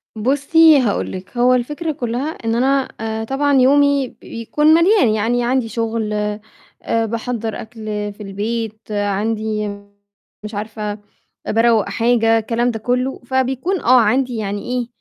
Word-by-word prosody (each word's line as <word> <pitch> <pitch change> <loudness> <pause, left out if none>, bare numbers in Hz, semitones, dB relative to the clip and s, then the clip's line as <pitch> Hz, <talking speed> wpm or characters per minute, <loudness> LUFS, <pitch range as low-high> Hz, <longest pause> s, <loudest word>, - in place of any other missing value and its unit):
بُصّي، 285 +6 +4
هاقول 230 -6 -1
لِك، 185 +6 -9
هو 250 +1 +4
الفكرة 295 +6 -1
كلّها 255 0 -3
إن 225 -7 -3
أنا 270 +2 +2
آآ، 220 0 -3
طبعًا 275 +4 0
يومي 280 0 +4
بيكون 230 +6 -2
مليان، 340 - +4
يعني 225 +3 0
عندي 250 0 0
شغل 225 -2 -2 0.7
آآ، 225 0 0
باحَضّر 230 0 -4
أكل 220 0 -11 0.3
في 210 - -11
البيت 215 +2 -4
عندي 210 +1 -1 0.8
مش 210 0 -7
عارفة 210 0 -4 0.6
أ - - 0
باروّق 225 -1 +3
حاجة، 230 -1 +2
الكلام 235 +2 0
ده 225 - -5
كلّه، 250 +4 -1
فبيكون 265 +8 -1
آه، 255 +1 +5
عندي 250 +3 +1
يعني 205 -1 -3
إيه، 245 -1 -2
235 Hz, 140 wpm, -19 LUFS, 220-260 Hz, 0.8 s, آه